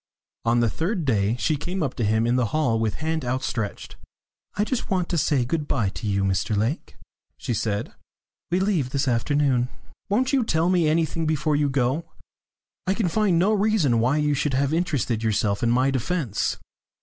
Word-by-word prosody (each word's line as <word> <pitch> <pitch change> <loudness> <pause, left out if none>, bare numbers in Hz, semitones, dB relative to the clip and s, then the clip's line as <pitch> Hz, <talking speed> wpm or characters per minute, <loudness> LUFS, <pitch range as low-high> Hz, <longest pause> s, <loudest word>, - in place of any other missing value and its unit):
On 120 +1 +3
the 120 - +3
third 170 - -2
day 110 -3 +1
she 155 +5 +1
came 175 +4 -3
up 135 - -2
to 120 - -3
him 110 +2 +2
in 120 +1 +2
the 125 -2 +2
hall 120 -3 +1
with 110 -2 -1
hand 160 -1 -2
outstretched. 125 -4 -3 0.6
"I 205 - +1
just 245 +3 -3
want 185 -4 0
to 175 - 0
say 140 -5 +1
good 150 +3 -2
bye 115 -8 0
to 110 +2 -6
you, 100 -1 +1
Mr 95 +2 0
Lake," 115 - -2 0.4
she 120 - -3
said. 105 -1 -2 0.6
"We 175 +2 +1
leave 185 -9 +1
this 140 +1 -1
afternoon." 125 +1 +1 0.4
"Won't 250 +7 +1
you 265 -3 +3
tell 165 -4 +1
me 175 -3 +3
anything 160 +1 0
before 155 -1 +1
you 145 -1 +2
go? 135 +4 0 0.8
I 190 - +2
can 205 -5 0
find 200 -2 +2
no 190 +6 +3
reason 200 - +2
why 125 +6 +2
you 150 -1 +1
should 140 -1 0
have 140 +2 +1
interested 140 - 0
yourself 105 -2 0
in 120 - +2
my 130 +3 +3
defence. 135 - -1
140 Hz, 190 wpm, -24 LUFS, 115-170 Hz, 0.8 s, On